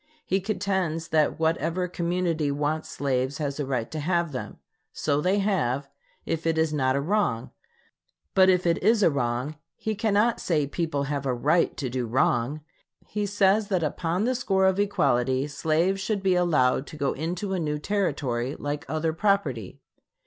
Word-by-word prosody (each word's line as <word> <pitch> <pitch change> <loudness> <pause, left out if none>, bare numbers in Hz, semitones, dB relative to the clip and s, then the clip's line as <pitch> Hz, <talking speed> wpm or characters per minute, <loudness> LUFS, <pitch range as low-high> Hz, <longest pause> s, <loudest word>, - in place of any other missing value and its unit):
He 190 +1 +1
contends 190 -5 -1
that 155 -2 +2
whatever 165 +2 0
community 170 -3 -1
wants 150 +2 -1
slaves 135 0 -1
has 145 -2 -3
a 145 - -2
right 125 -4 -2
to 155 - -4
have 170 +1 0
them. 130 - -6 0.3
So 145 -1 0
they 185 +5 +2
have, 150 - 0 0.4
if 165 0 -2
it 165 -1 +1
is 160 -1 +1
not 130 -3 +1
a - - +1
wrong. 160 - 0 0.8
But 190 0 +6
if 180 -1 +3
it 170 -1 +2
is 215 +2 +4
a 165 - +5
wrong, 130 +2 -2 0.2
he 220 - -3
cannot 215 +2 +2
say 155 -5 +1
people 145 -1 -2
have 140 -1 -2
a 125 - +1
right 155 +8 +2
to 135 - -2
do 125 -1 -2
wrong. 120 +4 +1 0.4
He 210 -1 -2
says 200 +1 +3
that 185 -5 0
upon 165 +5 -1
the 255 - +2
score 195 -6 +1
of 190 +1 +2
equality 130 -10 +1
slaves 160 +6 0
should 200 -1 -2
be 190 -1 +3
allowed 150 -7 +2
to 155 - -9
go 140 -2 0
into 180 +6 -3
a 185 - 0
new 150 -2 -1
Territory, 145 -9 -1
like 145 0 -4
other 160 +2 0
property. 160 - 0
160 Hz, 175 wpm, -26 LUFS, 140-190 Hz, 0.8 s, But